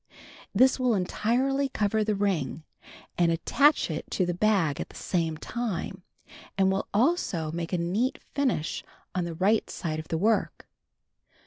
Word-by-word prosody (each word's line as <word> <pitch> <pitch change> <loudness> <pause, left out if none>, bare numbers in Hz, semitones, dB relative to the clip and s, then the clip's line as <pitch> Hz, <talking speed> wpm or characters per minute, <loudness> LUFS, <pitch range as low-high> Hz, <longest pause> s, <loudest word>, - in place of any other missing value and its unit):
This 260 +1 +4
will 250 -3 +2
entirely 255 +9 +1
cover 215 -1 +1
the 210 0 0
ring, 180 -7 -1 0.6
and 170 -1 +4
attach 280 - +3
it 155 - -5
to 185 - +1
the 175 - -1
bag 180 -6 +2
at - - -6
the - - -16
same 165 -3 -1
time, 195 -3 -4 0.6
and 190 -1 +4
will 195 +1 -1
also 205 - +1
make 170 0 -4
a 180 - +1
neat 195 +10 0 0.2
finish 260 - 0 0.3
on 180 -1 -1
the 170 -1 -5
right 205 +6 +2
side 155 -3 -3
of 155 - -7
the 165 - -1
work. 215 +5 0
195 Hz, 155 wpm, -27 LUFS, 170-230 Hz, 0.6 s, This